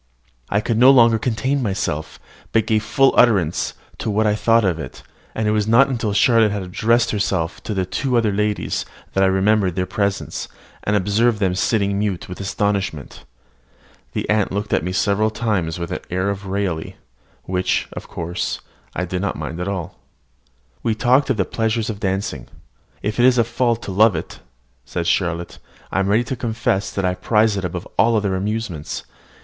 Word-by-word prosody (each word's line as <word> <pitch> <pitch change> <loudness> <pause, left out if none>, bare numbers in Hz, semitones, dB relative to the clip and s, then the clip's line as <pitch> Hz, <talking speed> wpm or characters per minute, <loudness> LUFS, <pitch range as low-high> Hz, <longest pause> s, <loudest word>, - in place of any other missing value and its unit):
I 100 - +1
could 115 0 -1
no 125 +2 +8
longer 115 -4 +6
contain 130 +4 0
myself, 95 -8 -3 0.3
but 110 -1 +3
gave 110 -1 +2
full 125 +5 +3
utterance 100 -10 +3 0.2
to - - -2
what 110 +1 +1
I 105 - +3
thought 115 +1 +3
of 85 -3 0
it: 65 -5 -8 0.3
and 110 -1 -1
it - - +3
was 105 -1 +1
not 120 +5 +5
until 115 -5 -1
Charlotte 110 +1 +4
had 100 -1 -3
addressed 115 +6 +1
herself 95 -5 -1
to 105 - -4
the 95 -1 0
two 125 +7 -1
other 110 -3 +2
ladies, 105 +1 -1 0.3
that 95 - +2
I - - +5
remembered 95 -1 +2
their 90 -1 0
presence, 100 +1 -2 0.4
and 105 - +1
observed 105 +4 +2
them 95 -3 +1
sitting 100 +1 +1
mute 100 -4 -2
with 90 +1 -7
astonishment. 95 -8 -2 0.9
The - - -2
aunt 105 -2 +1
looked 100 +2 -2
at - - +2
me 90 - -2
several 100 +4 +2
times 100 -8 -1
with 85 -1 -5
an - - -2
air 95 +3 0
of 100 0 -6
raillery, 95 -4 -2 0.5
which, 95 0 0
however, 85 +1 -6 0.6
I 90 - -1
did 90 +1 -3
not 100 - -1
at 80 +4 -4
all 95 -3 -2
mind. 90 - -11 0.9
We 110 - 0
talked 125 +5 +3
of 130 - +1
the 95 - +1
pleasures 110 0 -1
of 100 - -8
dancing. 95 - -2 0.6
"If 105 +3 -2
it 120 - +5
is 125 -1 +4
a 115 - +5
fault 115 0 0
to - - -5
love 105 +1 +4
it," 80 - -6 0.4
said 85 +5 -4
Charlotte, 85 -1 -1 0.3
"I - - 0
am 95 - +1
ready 105 +4 +3
to 130 - -4
confess 110 -5 -1
that 95 - -2
I 90 - +1
prize 105 +3 +2
it 100 - -3
above 90 0 -5
all 115 0 +4
other 100 -3 0
amusements. 100 -5 -3
100 Hz, 190 wpm, -20 LUFS, 95-115 Hz, 0.9 s, no